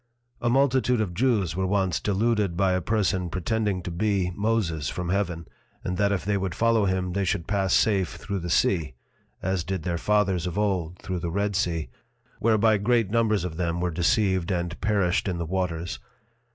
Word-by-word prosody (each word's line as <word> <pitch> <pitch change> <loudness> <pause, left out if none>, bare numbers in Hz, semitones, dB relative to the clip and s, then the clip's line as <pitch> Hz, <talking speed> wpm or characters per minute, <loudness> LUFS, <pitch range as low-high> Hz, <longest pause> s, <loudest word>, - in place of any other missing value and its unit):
A 120 - +1
multitude 130 -1 +3
of 100 -5 -1
Jews 105 -7 +1
were 95 0 0
once 95 -3 +1
deluded 105 -3 0
by 95 -1 +3
a 90 - 0
Person 95 -3 0
pretending 95 +2 -1
to 90 - -5
be 95 0 0
Moses 90 - -1
from 90 -1 -4
Heaven, 90 -4 -1 0.4
and 90 - -2
that 100 -1 +2
if 90 -5 -1
they 100 0 +1
would 95 -3 -3
follow 115 -2 +3
him 95 -1 -1
they 100 +1 0
should 85 -2 -1
pass 100 -2 0
safe 95 -5 +2
through 100 -1 -4
the 85 0 -5
Sea 80 -6 +1 0.5
(as 95 -2 0
did 95 -1 -3
their 85 -1 -2
Fathers 95 -4 +1
of 90 - -4
old 90 -5 0
through 90 0 -4
the 85 0 -3
Red 100 +3 -1
Sea) 85 - 0 0.5
whereby 110 -1 +3
great 115 -1 +2
numbers 110 -3 +2
of 85 -3 -5
them 85 -1 -1
were 90 0 0
deceived 95 +1 +1
and 85 -3 -2
perished 100 -3 +1
in 90 -2 -1
the 85 - -3
Waters. 85 -4 -2
95 Hz, 190 wpm, -26 LUFS, 85-105 Hz, 0.5 s, multitude